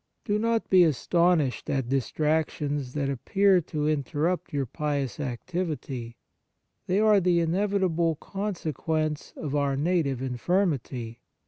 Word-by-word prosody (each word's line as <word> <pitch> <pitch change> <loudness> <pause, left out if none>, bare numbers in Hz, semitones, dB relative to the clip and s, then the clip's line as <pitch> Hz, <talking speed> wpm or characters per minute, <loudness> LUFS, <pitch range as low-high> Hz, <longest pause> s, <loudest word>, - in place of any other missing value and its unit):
Do 210 -1 +1
not 230 0 0
be 185 -2 +6
astonished 170 -2 +2
at 135 -3 -1
distrac 150 +4 +1
tions 145 -3 -4
that 140 -2 0
appear 190 - +3
to 150 -1 -2
interrupt 155 +4 -1
your 140 -2 -1
pious 140 0 -3
activity; 135 -4 -4 0.7
they 185 +2 +2
are 215 -1 +5
the 180 -2 +2
inevit 195 +4 +1
able 165 -2 +1
consequence 160 -5 -3
of 145 -3 -4
our 140 -2 +1
native 150 -4 +1
in 130 -1 -3
firmity. 135 - -1
155 Hz, 130 wpm, -27 LUFS, 140-180 Hz, 0.7 s, be